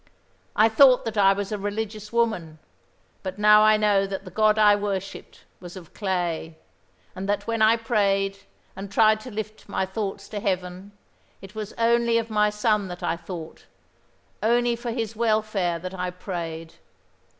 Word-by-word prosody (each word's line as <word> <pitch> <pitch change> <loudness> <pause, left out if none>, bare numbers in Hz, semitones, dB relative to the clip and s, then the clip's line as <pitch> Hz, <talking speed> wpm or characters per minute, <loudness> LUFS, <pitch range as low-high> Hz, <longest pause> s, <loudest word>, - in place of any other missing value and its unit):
I 215 - +5
thought 250 +3 +5
that 225 -1 -4
I 195 -2 +5
was 200 +1 -3
a 210 - -3
religious 210 +1 -5
woman; 215 -10 -1 0.6
but 185 0 -6
now 210 0 +6
I 215 0 +5
know 205 -2 +2
that 195 0 -6
the 185 - -10
God 215 +2 +3
I 210 -1 +6
worshipped 200 -2 -5 0.2
was 175 +1 -10
of 170 -4 -13
clay, 175 -5 -3 0.6
and 195 +1 -5
that 205 - -1
when 230 -1 -2
I 220 +2 +5
prayed 195 -4 0 0.4
and 195 +1 -7
tried 215 +1 +4
to 255 - -10
lift 215 -1 -7
my 190 - -1
thoughts 200 0 -5
to 210 - -4
Heaven 185 0 -3 0.5
it 195 +1 -13
was 215 -1 -6
only 235 0 +2
of 230 -1 -3
my 210 0 +3
son 210 -1 0
that 180 -1 -8
I 165 - 0
thought, 170 -1 -9 0.7
only 240 +2 +2
for 235 +1 -6
his 225 -2 -3
welfare 215 -6 0
that 185 +2 -7
I 180 -1 -3
prayed. 170 -3 -6
205 Hz, 170 wpm, -24 LUFS, 190-220 Hz, 0.7 s, now